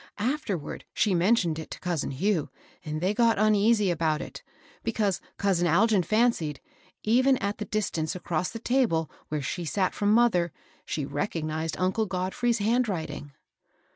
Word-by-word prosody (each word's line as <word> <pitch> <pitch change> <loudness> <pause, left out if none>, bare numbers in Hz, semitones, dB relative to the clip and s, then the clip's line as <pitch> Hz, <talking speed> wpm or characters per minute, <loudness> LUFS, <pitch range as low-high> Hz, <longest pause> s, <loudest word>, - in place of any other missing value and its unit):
Afterward 215 - -2
she 210 - +2
mentioned 175 -3 +2
it 160 - -7
to - - -8
cousin 175 -4 -2
Hugh, 160 +3 0 0.3
and 155 -1 -4
they 185 +3 +1
got 230 0 +3
uneasy 210 -1 +3
about 160 -2 0
it, - - -8 0.4
because 210 -4 0 0.2
couan 180 -3 +2
Algin 200 +3 +4
fancied, 215 - +1 0.4
even 255 +4 +4
at 200 0 -3
the 210 - -3
distance 185 -6 -2
across 175 -1 -2
the 230 - -6
table 225 - +1 0.2
where 150 -2 -3
she 175 +6 -3
sat 185 +3 0
from 205 0 +1
mother, 215 -7 +3 0.4
she 150 - -2
recognized 160 +1 -2
uncle 190 +4 +1
Godfrey's 190 +6 0
hand 230 +3 +1
writ 170 -5 -2
ing. 145 -1 -9
190 Hz, 155 wpm, -27 LUFS, 165-220 Hz, 0.4 s, Algin